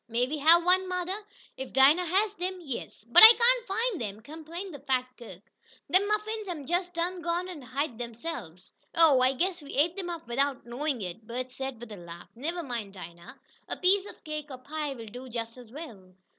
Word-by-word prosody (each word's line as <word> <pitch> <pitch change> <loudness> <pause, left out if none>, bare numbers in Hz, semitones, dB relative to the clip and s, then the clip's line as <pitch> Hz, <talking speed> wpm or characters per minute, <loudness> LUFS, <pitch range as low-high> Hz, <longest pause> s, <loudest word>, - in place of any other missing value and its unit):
May 235 +2 +1
we 295 +4 -4
have 335 +4 +6
one, 370 +1 +3
mother?" 365 +1 -2 0.4
"If 265 0 -7
Dinah 285 +7 +6
has 400 +4 +2
them, 370 -1 -3
yes." 270 -8 -7
"But 235 - +7
I - - +17
cain't 475 +1 +4
find 445 - -1
'em!" 210 -1 -5
complained 325 - -8
the 285 - -8
fat 260 -2 0
cook. 195 -7 -12 0.5
"Dem 380 +3 +4
muffins 425 0 -2
hab 320 -6 -5
jest 355 +3 -1
done 350 +2 -2
gone 345 +1 -1
an' 350 -5 -8
hid 255 -1 -3
de'se'ves." 235 - -7 0.2
"Oh, 315 -6 +6
I 260 +1 +4
guess 355 +5 -1
we 285 - -9
ate 325 +5 +2
them 375 -3 -4
up 335 -7 -6
without 270 +2 -1
knowing 250 0 -2
it," 190 +5 -7
Bert 250 +2 -4
said, 265 -2 -5
with 240 -1 -10
a 210 - -7
laugh. 170 0 -11
"Never 330 +8 -4
mind, 230 -8 -4
Dinah, 170 -1 -11 0.3
a - - -4
piece 390 +2 +2
of - - -14
cake, 305 -1 -5
or 260 - -7
pie 290 +2 -4
will 230 -2 -9
do 250 +4 -9
just 230 -1 -5
as 245 -3 -14
well." 215 - -10
290 Hz, 210 wpm, -28 LUFS, 240-355 Hz, 0.5 s, I